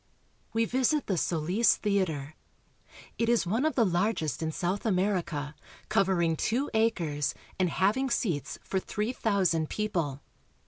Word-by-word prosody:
We 225 0 +2
visit 260 +5 +1
the 195 - 0
Solis 175 +7 +2
Theater. 170 -9 -1 0.9
It 230 0 +2
is 235 -4 +3
one 225 - 0
of 315 - +1
the 235 - +4
largest 175 - 0
in 160 0 -1
South 180 +5 -2
America, 180 -8 0 0.4
covering 175 -4 +2
two 245 - -1
acres 170 -11 +1 0.2
and 185 -1 +3
having 215 +10 +1
seats 165 - -1
for 190 - -1
three 210 +5 -3
thousand 185 -9 +1
people. 170 -10 -2
190 Hz, 135 wpm, -29 LUFS, 160-225 Hz, 0.9 s, the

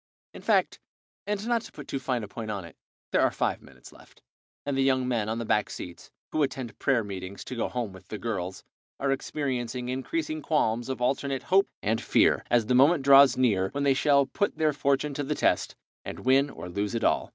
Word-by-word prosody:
In - - -10
fact, - - +2 0.5
and 210 +1 -2
not 235 -1 +2
to - - -12
put 145 - -10
too 135 - -3
fine 125 -3 -2
a - - -6
point 110 +2 -7
upon 100 -4 -4
it, 85 - -13 0.4
there - - +3
are - - +4
five - - -1
minutes - - -15
left, - - -19 0.4
and 140 -1 -1
the 135 - +1
young 130 -1 +2
men 115 -4 0
on 110 - -2
the 115 - -3
back 105 -1 +1
seats, 85 -2 -9 0.2
who 155 - 0
attend 130 -4 -3
prayer 130 -5 +2
meetings 95 -1 -7
to 130 - -7
go 115 - -1
home 120 -6 -3
with 95 0 -14
the 105 - -5
girls, 95 -5 -4 0.4
are 135 0 0
experiencing 125 -3 -3
increasing 310 - -3
qualms 120 - 0
of 130 -2 -3
alternate 135 +1 -1
hope 195 +1 +3 0.2
and 110 +2 0
fear - - +3
as 120 -2 +3
the 125 - +1
moment 140 +4 +5
draws 140 -2 +7
near 105 -7 +2
when 140 0 -1
they 140 -1 +4
shall 140 0 +3
put 205 +8 -2
their 155 -1 +2
fortune 140 +1 0
to 145 - -3
the - - -2
test, - - +1 0.3
and - - -7
win 135 +2 +4
or 85 - -8
lose 100 +5 -3
it 115 - -2
all. - - +1
130 Hz, 220 wpm, -27 LUFS, 110-140 Hz, 0.5 s, draws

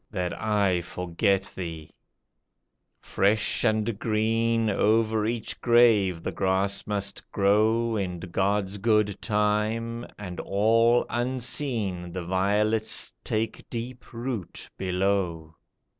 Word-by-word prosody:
That 90 -4 -2
I 100 -5 +1
forget 90 +3 -1
thee! 80 -4 -6 1.1
Fresh 105 +2 +1
and 110 -1 +1
green 115 +1 +1
Over 110 +1 +2
each 115 -1 -4
grave 110 -8 +4
the - - -2
grass 95 +3 0
must 100 -1 -4
grow 110 +3 +2
In 90 -4 -2
God's 95 +2 -1
good 105 -2 +1
time, 110 +2 0
and, 90 -4 -7
all 115 +4 +3
unseen, 120 -7 -1
The 90 -2 -4
violets 105 +4 +1
take 110 +1 -3
deep 120 +1 -7
root 120 -5 -5
below. 90 -4 -1
105 Hz, 100 wpm, -26 LUFS, 95-115 Hz, 1.1 s, grave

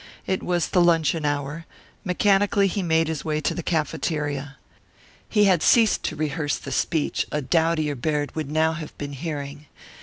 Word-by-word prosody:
It 190 - -1
was 175 -2 0
the 180 - +3
luncheon 165 -2 +2
hour; 145 +3 -3 0.4
mechanically 200 +1 +2
he 195 +1 -1
made 165 -2 +2
his 160 -3 -3
way 155 -1 -1
to - - 0
the 175 - -4
cafeteria. 150 -3 -2 0.7
He 210 -2 +3
had 185 -5 +4
ceased 225 -3 +4
to - - -2
rehearse 150 -1 -1
the 140 - -8
speech 155 +3 0
a 150 - 0
doughtier 160 +1 +1
Baird 145 +2 -2
would 155 -3 -3
now 160 +1 +2
have 155 -1 -8
been 145 -1 -5
hearing. 145 -1 -6
155 Hz, 170 wpm, -24 LUFS, 145-175 Hz, 0.7 s, had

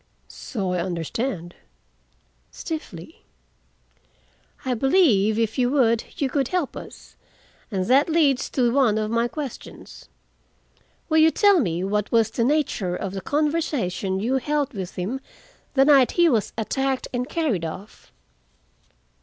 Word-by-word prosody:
"So 195 -7 -5
I 180 - -1
understand," 175 - -3 1.0
stiffly. 210 - -8 1.4
"I 255 - 0
believe, 235 - +3
if 225 +2 -1
you 245 -1 +3
would, 235 -5 +2
you 280 - 0
could 270 -1 0
help 355 -4 -2
us, - - -11 0.5
and 190 -5 -2
that 270 - +4
leads 300 -5 +2
to 240 -3 +1
one 250 -6 +3
of 215 0 -2
my 230 +1 +1
questions. 280 -1 -9 1.0
Will 315 -1 +3
you 315 +1 +6
tell 405 +2 +4
me 175 - -1
what 210 +1 -1
was 225 -1 +3
the 230 - -1
nature 245 -10 0
of 195 0 -5
the 195 - -5
conversation 285 - -1
you 245 +6 0
held 290 +1 -1
with 190 -4 -6
him 210 +9 -3 0.5
the 270 0 +5
night 275 -4 +5
he 345 -1 +4
was 230 -10 +1
attacked 265 +4 -1
and 250 +2 -2
carried 290 - -1
off?" 185 +6 -8
245 Hz, 135 wpm, -23 LUFS, 200-285 Hz, 1.4 s, you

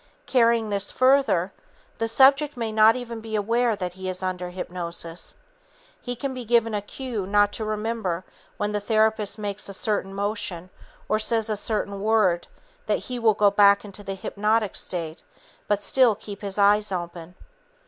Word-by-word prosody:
Carrying 230 -3 +2
this 200 0 +1
further, 255 -9 +3 0.5
the 225 - 0
subject 275 +4 +4
may 230 -2 -2
not 220 +1 +5
even 235 -2 -6
be 220 0 -5
aware 230 +2 +1
that 180 -3 -4
he 190 0 -6
is 185 0 -5
under 180 -1 -3
hypnosis. 175 -2 -5 0.7
He 245 - -4
can 265 +3 -4
be 255 -1 -6
given 230 -1 +2
a 205 - -1
cue 220 -2 -5
not 205 0 +3
to 220 - -3
remember 215 -4 -2 0.3
when 205 0 -1
the 210 - -1
therapist 215 -1 +1
makes 205 -1 -4
a 195 - -6
certain 200 -1 -1
motion 200 -3 -3 0.4
or 215 - +1
says 220 0 +2
a - - 0
certain 200 -1 -2
word 210 -5 +2 0.4
that - - +2
he 250 -1 -6
will 220 -3 +3
go 205 -1 +4
back 200 0 +5
into 205 0 -9
the 195 0 -5
hypnotic 210 +2 -1
state 165 -2 -4 0.4
but 205 -1 0
still 250 -3 +4
keep 200 -1 -10
his 200 -1 -5
eyes 205 +1 +3
open. 175 -1 -6
210 Hz, 170 wpm, -24 LUFS, 195-225 Hz, 0.7 s, not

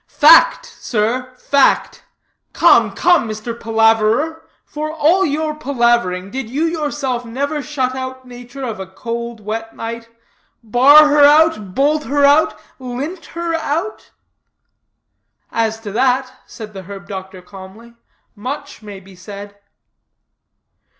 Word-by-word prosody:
"Fact, 315 +2 +5
sir, 250 +3 -3
fact. 280 +2 +1 0.5
Come, - - +4
come, 350 -10 +2
Mr. 215 +2 -5
Palaverer, 225 +8 +1 0.2
for 305 +1 -5
all 325 +5 +2
your 305 -1 -1
palavering, 235 -10 0
did 260 -3 -5
you 285 +6 -2
yourself 295 -6 -2
never 280 +6 -3
shut 260 -2 -2
out 260 0 -7
nature 245 +2 -10
of 225 -5 -5
a 190 - -6
cold, 235 +4 -6
wet 225 +2 -6
night? 230 0 -7 0.5
Bar 275 +7 +6
her 295 0 +4
out? 290 - +4
Bolt 300 +2 +1
her 285 +3 +2
out? 285 -7 +3 0.2
Lint 270 +8 -6
her 340 -1 -2
out?" 325 +5 -3 1.4
"As 225 -1 -1
to 210 -2 -7
that," 255 +3 0
said 215 -3 -10
the 190 - -8
herb 195 +1 -11
doctor 190 -2 -8
calmly, 195 +5 -13 0.4
"much 250 +6 -7
may 205 -2 -10
be 190 0 -17
said." 200 +2 -10
245 Hz, 125 wpm, -17 LUFS, 215-290 Hz, 1.4 s, Bar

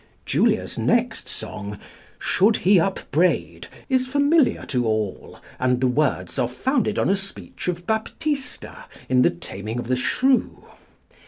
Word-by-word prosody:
Julia's - - +1
next - - +1
song, 105 0 -6 0.4
"Should 210 +4 +3
he 190 0 +6
upbraid," 180 -1 0 0.2
is 260 -1 +1
familiar 285 +2 +3
to 125 -4 -1
all, 110 -3 -3 0.2
and 125 -1 +2
the 130 - +1
words 140 +1 0
are 125 - +2
founded 225 - 0
on - - +2
a 195 - +3
speech 195 -1 -6
of 175 -1 -2
Baptista 270 - -3 0.2
in 125 -1 +4
The - - +5
Taming 100 +6 -6
of 120 - -3
the 130 - +3
Shrew. 255 - +1
175 Hz, 140 wpm, -23 LUFS, -, 0.4 s, he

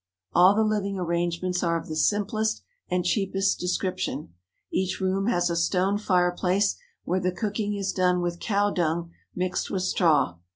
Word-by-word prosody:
All 185 +3 +6
the 220 - +3
living 205 -2 -1
arrangements 175 +1 -1
are 170 -1 +1
of - - -11
the 155 - -5
simplest 210 +5 0 0.3
and 180 -1 0
cheapest 195 0 +1
description. 180 - -2 0.4
Each 190 0 -1
room 190 +1 0
has 175 -7 +2
a - - -1
stone 185 +4 +1
fireplace 185 0 +2 0.3
where 185 - 0
the 185 0 0
cooking 205 +2 -2
is 195 -1 -2
done 180 -1 +2
with 175 -1 -2
cow 205 -1 +1
dung 170 -1 -1 0.2
mixed 180 0 -2
with 185 -2 -2
straw. 160 - +2
185 Hz, 160 wpm, -26 LUFS, 175-200 Hz, 0.4 s, All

